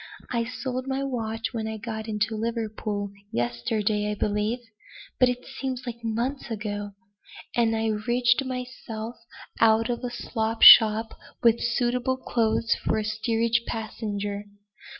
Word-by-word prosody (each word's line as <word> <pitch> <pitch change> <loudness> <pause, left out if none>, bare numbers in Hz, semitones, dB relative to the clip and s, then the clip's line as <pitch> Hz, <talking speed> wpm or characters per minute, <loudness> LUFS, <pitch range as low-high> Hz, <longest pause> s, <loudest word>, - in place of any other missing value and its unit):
I 235 -2 0
sold 255 +1 -4
my 270 +1 -1
watch 225 -3 -3
when 220 -2 -3
I 220 0 -4
got 220 0 -5
into 215 0 -1
Liverpool 215 -2 -3 0.2
yesterday, 205 - -1
I 210 - -2
believe 210 +3 0 0.6
but 255 - +6
it 250 0 -4
seems 265 -2 -5
like 235 -1 -7
months 240 +5 -2
ago. 205 -2 -4 0.6
And 230 -2 +2
I 220 0 -1
rigged 240 +4 +2
myself 250 -3 -6 0.4
out 225 +1 +4
at 240 - -4
a 245 - -2
slop 225 -2 -2
shop 220 0 +9 0.3
with 235 -1 +4
suitable 245 +2 0
clothes 230 -3 +1
for - - +1
a 215 - 0
steerage 225 +2 +1
passenger. 205 -2 -4
225 Hz, 135 wpm, -26 LUFS, 215-240 Hz, 0.6 s, shop